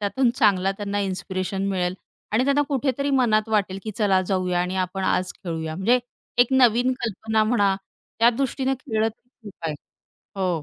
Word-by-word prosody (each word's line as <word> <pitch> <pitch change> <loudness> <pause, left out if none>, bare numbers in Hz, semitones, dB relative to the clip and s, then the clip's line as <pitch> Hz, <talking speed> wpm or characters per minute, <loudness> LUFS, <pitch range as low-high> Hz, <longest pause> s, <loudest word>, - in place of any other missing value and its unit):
त्यातून 235 +5 +1
चांगला 195 -5 +3
त्यांना 205 0 -3
इन्स्पिरेशन 190 0 -2
मिळेल 180 -2 -1 0.4
आणि 230 +4 +3
त्यांना 280 +1 +3
कुठेतरी 280 0 0
मनात 225 -5 +2
वाटेल, 200 -3 0
की 215 - -4
चला 195 -3 +3
जाऊया 180 -2 0
आणि 180 +1 -2
आपण 185 +1 -2
आज 185 -1 +1
खेळूया. 160 -4 -5
म्हणजे 230 +7 +3 0.4
एक 245 - +7
नवीन 250 -1 +4
कल्पना 220 -1 0
म्हणा. 205 -4 +2 0.4
त्यादृष्टीनं 260 +3 +2
खेळलं 225 -5 0
तरी 225 +2 -16 0.2
खूप - - -23
आहे. 155 - -2 0.6
हो. 180 -5 0
210 Hz, 160 wpm, -24 LUFS, 185-245 Hz, 0.6 s, एक